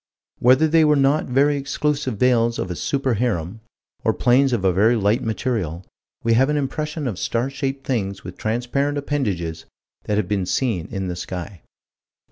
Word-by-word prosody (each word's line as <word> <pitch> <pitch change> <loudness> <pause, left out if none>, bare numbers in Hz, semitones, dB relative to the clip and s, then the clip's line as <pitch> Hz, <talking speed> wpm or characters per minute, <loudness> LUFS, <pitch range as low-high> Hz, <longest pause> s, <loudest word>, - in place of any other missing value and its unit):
Whether 130 +6 +5
they 160 +1 +4
were 150 -1 +4
not 140 +2 +2
very 140 +3 +3
exclusive 145 -3 -1
veils 120 -1 +2
of 90 - -3
a - - -3
super 135 - -1
harem, 105 -4 -1 0.4
or - - +1
planes 130 +2 +3
of 110 -6 0
a 95 - +4
very 110 +6 +4
light 105 +1 +2
material, 110 -7 -2 0.4
we 115 - +3
have 130 +5 +4
an 150 - +1
impression 150 +1 -3
of 100 -7 -4
star 120 +7 -1
shaped 135 0 -4
things 100 -6 -2
with 90 0 -8
transparent 125 +6 -1
appendages 100 - -2 0.4
that 105 - 0
have 105 -4 0
been 95 -3 -1
seen 105 -8 -1
in 95 -3 -4
the 90 - -3
sky. 90 +1 -6
120 Hz, 175 wpm, -22 LUFS, 100-140 Hz, 0.4 s, Whether